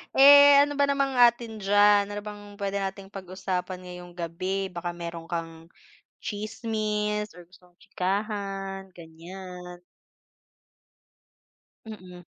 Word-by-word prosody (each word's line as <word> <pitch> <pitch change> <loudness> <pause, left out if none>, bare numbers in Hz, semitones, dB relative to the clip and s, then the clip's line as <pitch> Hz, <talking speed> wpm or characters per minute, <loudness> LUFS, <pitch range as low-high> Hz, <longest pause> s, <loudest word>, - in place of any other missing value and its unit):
Eh, 285 +1 +9
ano 290 0 +2
ba 285 - +2
namang 275 -1 +1
atin 235 -2 +3
diyan? 205 0 +4
Ano 205 - -4
bang 210 0 -9 0.2
pwede 200 0 -2
nating 195 0 -5
pag-usapan 185 -1 -5
ngayong 180 -1 -10
gabi? 185 +3 -3
Baka 175 -1 -5
meron 170 -1 -7
kang 165 0 -6 0.5
tsismis 210 -1 -2
or 175 - -12
gustong 180 0 -22
tsikahan, 195 0 -4
ganyan. 180 +2 -11 2.0
Mm. 185 -5 -11
195 Hz, 105 wpm, -26 LUFS, 180-210 Hz, 2.0 s, Eh